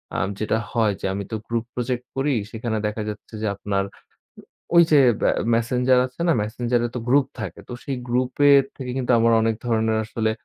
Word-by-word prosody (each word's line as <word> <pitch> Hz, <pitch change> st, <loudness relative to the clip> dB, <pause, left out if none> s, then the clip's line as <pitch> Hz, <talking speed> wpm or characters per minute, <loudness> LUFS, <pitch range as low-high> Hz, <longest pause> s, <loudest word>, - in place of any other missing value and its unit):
আ -, -, 0 dB, 0.2 s
যেটা 110 Hz, +1 st, 0 dB
হয় 110 Hz, -3 st, +2 dB
যে -, -, -4 dB
আমি 100 Hz, +1 st, -3 dB
তো -, -, -2 dB
গ্রুপ 115 Hz, 0 st, -2 dB
প্রজেক্ট 125 Hz, 0 st, -3 dB
করি 135 Hz, +2 st, +1 dB, 0.2 s
সেখানে 115 Hz, 0 st, -3 dB
দেখা 105 Hz, +1 st, -4 dB
যাচ্ছে 105 Hz, +2 st, -9 dB
যে 110 Hz, -, -1 dB
আপনার 100 Hz, 0 st, -1 dB, 0.6 s
উ -, -, -11 dB, 0.3 s
ওই 170 Hz, -, +9 dB
যে 150 Hz, -, +7 dB, 0.3 s
আ -, -, +4 dB, 0.2 s
মেসেঞ্জার 125 Hz, +2 st, +2 dB
আছে 130 Hz, +6 st, -11 dB
না? 165 Hz, -, +4 dB
মেসেঞ্জার 120 Hz, +3 st, -1 dB
এ -, -, -9 dB
তো -, -, -1 dB
গ্রুপ 140 Hz, +1 st, +4 dB, 0.2 s
থাকে। -, -, -6 dB
তো -, -, -5 dB
সেই 140 Hz, -, -3 dB
গ্রুপ 125 Hz, +1 st, +1 dB, 0.2 s
এর 140 Hz, -1 st, +6 dB
থেকে 130 Hz, -2 st, -5 dB
কিন্তু 130 Hz, -1 st, 0 dB
আমার 115 Hz, 0 st, +4 dB
অনেক 115 Hz, 0 st, +1 dB
ধরনের 110 Hz, -1 st, +1 dB
আসলে 110 Hz, 0 st, -1 dB
120 Hz, 205 wpm, -23 LUFS, 110-125 Hz, 0.6 s, ওই